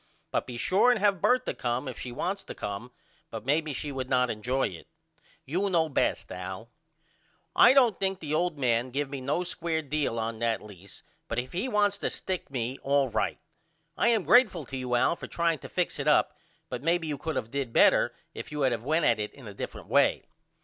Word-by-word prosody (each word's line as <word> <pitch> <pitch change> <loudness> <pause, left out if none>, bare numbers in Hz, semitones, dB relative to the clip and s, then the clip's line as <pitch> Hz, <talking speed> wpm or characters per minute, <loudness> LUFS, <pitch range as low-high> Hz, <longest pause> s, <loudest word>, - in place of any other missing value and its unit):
But - - -1
be 120 - -6
sure 190 - +3
and 245 -3 +3
have 200 -3 +2
Bertha 255 0 +2
come 125 +3 -2
if 130 - -6
she 125 - -5
wants 190 +10 -3
to - - -8
come 105 +5 -5 0.4
but - - -7
maybe 150 +3 +1
she 145 +1 -4
would 130 -1 -4
not 125 -1 +3
injoy 120 +1 -1
it. 80 -3 -12 0.6
You 185 +8 0
know 165 -3 +2
best 140 - 0
Al. 95 +5 -7 0.8
I - - +8
don't 245 -7 +4
think 190 -1 0
the 150 -3 -4
old 170 0 0
man 120 -2 +1
give 140 +2 -2
me 140 -2 -4
no 145 +7 0
square 170 -2 -2
deal 145 -4 -1
on 115 0 -3
that 115 -1 +1
lease 100 -2 -13 0.2
but 115 - -3
if 125 +1 -3
he 190 +9 -1
wants 205 -2 +2
to - - -1
stick 185 -2 -4
me 130 -1 -3
all 140 -1 +2
right. - - -1 0.6
I - - +2
am 225 -4 +3
grateful 210 - +4
to 135 - -7
you 125 -1 -1
Al 120 - +3
for - - -8
trying 170 -2 0
to - - -10
fix - - -1
it - - -2
up - - +3 0.3
but - - -5
maybe 165 +2 +1
you 150 -3 -3
could 160 -1 -3
of 110 - -4
did 135 -4 -2
better - - +5 0.2
if - - -7
you 150 0 -3
had 130 -2 +3
of 115 -1 -4
went 155 +4 +1
at 115 -3 +3
it 105 - -3
in 135 - -13
a 100 - -8
different - - -7
way. - - +3
140 Hz, 220 wpm, -28 LUFS, 120-175 Hz, 0.8 s, I